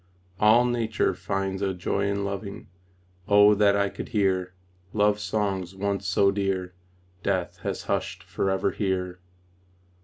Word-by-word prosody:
All 110 +3 +6
nature 120 -2 0
finds 95 0 -3
a 95 -2 -1
joy 100 +3 -1
in 100 0 -1
loving 100 0 -6 0.6
Oh, 105 0 +7
that 100 -1 +4
I 100 0 +2
could - - -7
hear 95 -4 0 0.4
Love 105 0 +2
songs 100 -3 -2
once 100 0 -2
so 100 +2 +3
dear 95 -2 -2 0.5
Death - - -1
has - - -4
hushed - - -2
forever 95 0 0
here! 90 -3 -2
100 Hz, 130 wpm, -26 LUFS, 95-105 Hz, 0.6 s, Oh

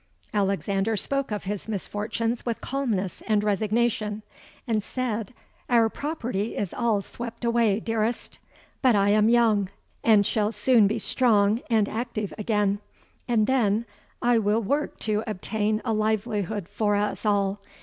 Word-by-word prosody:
Alexander 200 +2 0
spoke 275 +6 -1
of 210 -1 -3
his 205 +1 -4
misfortunes 220 +3 -2
with 235 -2 -2
calmness 225 -9 -2
and 210 -2 +2
resignation; 215 0 0 0.4
and 225 -4 0
said, 230 -2 -3 0.4
'Our 230 -2 +4
property 240 -7 -3
is 200 - -2
all 225 -4 +1
swept 235 +2 -7
away, 230 -3 +2
dearest; 225 +1 -2 0.4
but 255 -4 +4
I 200 0 +3
am 210 +1 +4
young, 220 -5 +3 0.3
and 215 -3 +5
shall 215 +1 +1
soon 220 0 +4
be 220 +3 -1
strong 215 0 +2
and 220 -3 +3
active 220 -3 -3
again; 205 -2 +1 0.5
and 225 -3 +3
then 225 -3 +2 0.4
I 240 -1 +4
will 215 +2 +1
work 285 +9 -1
to 215 0 0
obtain 215 +1 -1
a 225 - +1
livelihood 215 -3 -1
for 205 0 0
us 205 +1 -1
all. 200 -2 +1
215 Hz, 140 wpm, -26 LUFS, 205-235 Hz, 0.5 s, and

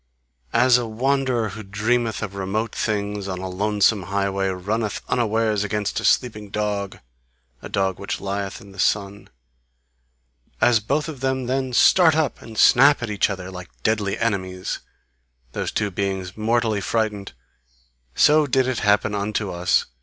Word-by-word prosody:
As 125 +1 +5
a 120 - -3
wanderer 125 0 0
who 110 +3 -8
dreameth 110 +3 -1
of 100 -2 -5
remote 100 +4 -2
things 105 -2 -2
on 95 -1 -3
a 95 +1 -5
lonesome 105 +2 +1
highway, 100 0 0
runneth 100 +3 -2
unawares 110 -3 +1
against 105 0 -2
a - - -6
sleeping 105 -5 +1
dog, 100 -1 -2 0.6
a - - -8
dog 95 -2 -1
which 100 - -4
lieth 100 0 -4
in 100 - -14
the 95 - -14
sun: 100 +1 -1 1.3
As 120 -2 +4
both 140 +9 -1
of 155 -5 -7
them 130 0 -1
then 130 +1 -1
start 160 +6 +5
up 155 -4 0
and 110 -1 -11
snap 140 +3 +6
at 115 - -3
each 100 0 +1
other, 95 -1 -5
like 90 -1 -9
deadly 105 -3 0
enemies, 95 -5 -2 0.7
those - - -3
two 105 -1 -1
beings 95 -1 -3
mortally 110 -1 0
frightened 105 -2 -2 0.8
so 150 0 +5
did 130 -1 +2
it 130 -2 -1
happen 105 0 +2
unto 105 0 -2
us. 90 +1 +1
105 Hz, 155 wpm, -22 LUFS, 100-120 Hz, 1.3 s, snap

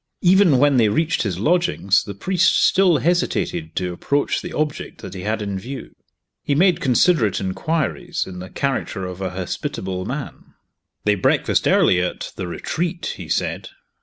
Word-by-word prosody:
Even 180 -5 +5
when 140 0 +4
they 110 -3 +4
reached 160 +10 +1
his 95 -6 -2
lodgings, 110 - +2
the 100 - -7
priest 185 - +2
still 185 -4 +4
hesitated 175 -1 -1
to 90 -1 -2
approach 140 +11 0
the - - -7
object 150 -1 -3
that 95 - -7
he 95 - -7
had 110 +2 -2
in 100 -2 -3
view. 130 +7 -8 0.5
He 140 - 0
made 175 +2 +3
considerate 125 - +3
inquiries, 160 - -2
in 90 -1 -8
the 90 +1 -8
character 130 -8 -2
of 90 +1 -7
a 95 - -1
hospitable 95 0 -4
man. 135 +1 -7 0.5
"They 105 - +3
breakfast 95 - +1
early 90 - +4
at 90 - -4
The 95 - -4
Retreat," 170 - -3
he - - -9
said. - - -2
130 Hz, 165 wpm, -21 LUFS, -, 0.5 s, Even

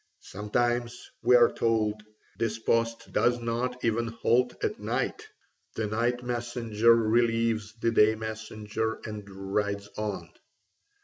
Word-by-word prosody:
Sometimes, 120 +4 -2
we 125 +2 +5
are 120 -1 +6
told, 110 -2 0 0.4
this 115 -1 0
post 115 0 -1
does 120 0 +3
not 120 +2 -2
even 115 +1 +1
halt 120 +2 +1
at - - -1
night: - - -2 0.5
the 110 - -1
night 120 +3 0
messenger 120 -2 +2
relieves 115 -1 +1
the 115 +1 0
day 110 -1 +5
messenger 110 0 -4
and 105 -2 -7
rides 100 +1 -2
on. 105 -2 -4
115 Hz, 120 wpm, -28 LUFS, 110-120 Hz, 0.5 s, are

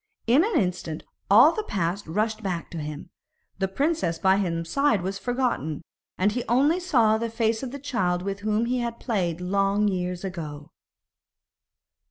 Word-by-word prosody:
In 255 +8 +5
an 440 +3 +2
instant 175 -4 -2 0.3
all 235 +10 +8
the 435 - -2
past 190 - -2
rushed 215 +6 -1
back 180 -5 -4
to 170 - -5
him; 150 +2 -7 0.5
the 190 - +1
princess 275 - 0
by 190 0 +3
his 165 -4 -1
side 275 - +2
was 195 +1 -3
forgotten, 230 - -1 0.3
and 200 +3 +2
he 240 +2 -2
only 285 +9 +3
saw 235 -12 +3
the 230 0 -2
face 225 0 0
of 265 - -4
the 280 - -6
child 190 -11 -1
with 195 +1 -3
whom 215 +2 0
he 250 +1 0
had 235 -1 -3
played 180 -8 -1
long 195 +3 +1
years 180 -2 -2
ago. 155 -6 -6
205 Hz, 170 wpm, -25 LUFS, 180-240 Hz, 0.5 s, all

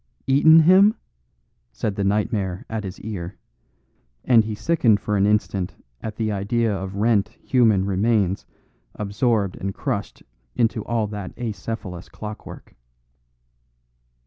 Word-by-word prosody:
"Eaten 160 +4 +6
him?" 190 +6 +6 0.8
said 105 - -3
the 100 - -2
nightmare 100 -2 -1
at 110 -1 -4
his 95 0 -7
ear; 100 -4 -6 0.9
and 115 -3 +5
he 110 -1 -4
sickened 115 -6 +2
for 105 0 -2
an 100 0 +3
instant 100 -3 0 0.3
at 110 -1 -5
the 110 -1 -1
idea 105 +2 0
of 95 0 -5
rent, 105 -2 +2
human 110 -7 +3
remains 100 -1 +1 0.5
absorbed 105 -1 0
and 95 +1 -4
crushed - - -4 0.3
into 115 -2 +1
all 115 -2 0
that 105 -2 -7
acephalous 105 -6 -5
clockwork. 105 +6 -9
105 Hz, 120 wpm, -23 LUFS, 100-115 Hz, 0.9 s, Eaten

